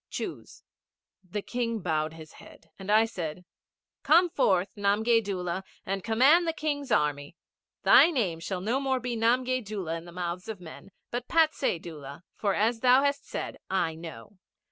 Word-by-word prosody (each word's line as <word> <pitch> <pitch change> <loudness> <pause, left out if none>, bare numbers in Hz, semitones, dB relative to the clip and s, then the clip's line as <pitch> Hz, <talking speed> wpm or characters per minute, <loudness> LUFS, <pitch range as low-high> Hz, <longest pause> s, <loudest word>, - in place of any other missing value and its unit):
Choose.' - - -7 0.6
The 200 +3 -5
King 235 -2 -2
bowed 155 -2 -1
his 160 -1 -12
head, 165 - -17
and 195 +1 -4
I 220 +1 +5
said, 180 -5 -6 0.6
'Come 345 +2 +4
forth, 190 - +1
Namgay 220 +3 +2
Doola, 185 -2 -3 0.2
and 195 0 -3
command 270 +10 +4
the 325 - 0
King's 290 -3 -3
Army. 145 +1 0 0.5
Thy - - +7
name 205 - -1
shall 180 +2 -4
no 230 +7 0
more 265 -1 0
be 245 -1 -3
Namgay 250 +3 +2 0.4
in 165 0 -7
the 175 - -11
mouths 180 +1 -4
of 215 -4 -5
men, 175 +2 -11 0.2
but 245 +1 -4
Patsay 315 - +2
Doola, 150 -2 -10
for 200 -3 0
as 225 +2 +1
thou 255 +3 +5
hast 280 0 -1
said, - - -5
I 185 -4 0
know.' 165 - -11
205 Hz, 165 wpm, -28 LUFS, 170-250 Hz, 0.6 s, Thy